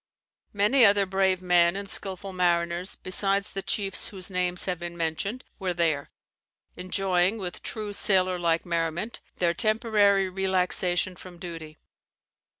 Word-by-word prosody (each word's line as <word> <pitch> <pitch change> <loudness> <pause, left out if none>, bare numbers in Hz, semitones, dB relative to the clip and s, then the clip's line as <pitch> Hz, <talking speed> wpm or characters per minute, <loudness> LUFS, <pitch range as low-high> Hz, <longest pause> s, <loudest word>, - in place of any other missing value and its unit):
Many 210 +6 +4
other 200 -2 +5
brave 190 -1 +1
men 175 -1 +3
and 200 0 -5
skilful 195 0 -1
mariners, 175 0 0
besides 195 +2 0
the 195 - -4
chiefs 195 -1 -1
whose 190 -1 -4
names 180 -1 0
have 180 -3 -2
been 175 0 -6
mentioned, 170 +9 -3 0.2
were 185 -3 -2
there, 160 -4 0 0.7
enjoying, 185 +2 0
with 185 -4 -6
true 215 -2 -5
sailor 185 -2 +2
like 165 -1 0
merriment, 170 +5 -2 0.2
their 170 -1 +1
temporary 210 -1 +2
relaxation 185 -1 0
from 180 0 -12
duty. 165 -3 -9
185 Hz, 135 wpm, -26 LUFS, 175-195 Hz, 0.7 s, other